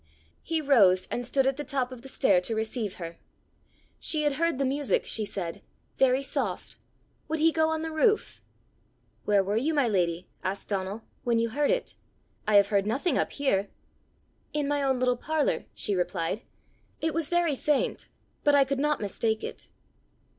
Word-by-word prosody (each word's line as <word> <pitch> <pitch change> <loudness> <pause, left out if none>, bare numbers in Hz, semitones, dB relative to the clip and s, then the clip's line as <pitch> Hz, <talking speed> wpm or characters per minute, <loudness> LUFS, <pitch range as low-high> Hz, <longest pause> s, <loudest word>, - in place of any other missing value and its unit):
He 325 -1 -1
rose 200 -11 +5
and 245 - -1
stood 270 +1 +2
at 270 0 +1
the 295 - -3
top 265 -3 -2
of 255 -2 -9
the 270 - -11
stair 195 -10 +3
to 225 +5 -2
receive 220 -2 -2
her. 170 -1 -8 0.8
She 310 -2 +1
had 290 -2 +1
heard 335 -2 +1
the 275 - +1
music, 280 +1 +1
she 220 - 0
said 175 -5 -4 0.4
very 265 +1 +4
soft: - - -3 0.5
would 320 +2 -1
he 320 +1 +4
go 320 0 +2
on 320 0 -1
the 320 - -3
roof? 420 +7 +1 0.8
"Where 205 -2 +4
were 200 +3 -1
you, 305 +7 0
my 280 -4 +3
lady," 180 -4 0 0.2
asked 195 +2 -3
Donal, 200 +2 -3 0.2
"when 235 -2 +2
you 230 0 +1
heard 285 +5 0
it? - - 0 0.5
I 215 - +3
have 200 0 +6
heard 200 -1 +1
nothing 275 +10 +1
up - - -1
here!" 205 -9 0 0.8
"In 295 -1 0
my 290 0 0
own 265 -2 +1
little 250 -1 +2
parlour," 305 +3 0
she 205 - -1
replied. 180 +2 -1 0.6
"It 320 -1 -1
was 325 -2 0
very 345 -3 +2
faint, 290 +1 0 0.4
but 290 -1 +5
I 280 - +6
could 270 0 -2
not 300 -2 +1
mistake 220 +2 -1
it." - - -7
260 Hz, 180 wpm, -28 LUFS, 205-295 Hz, 0.8 s, have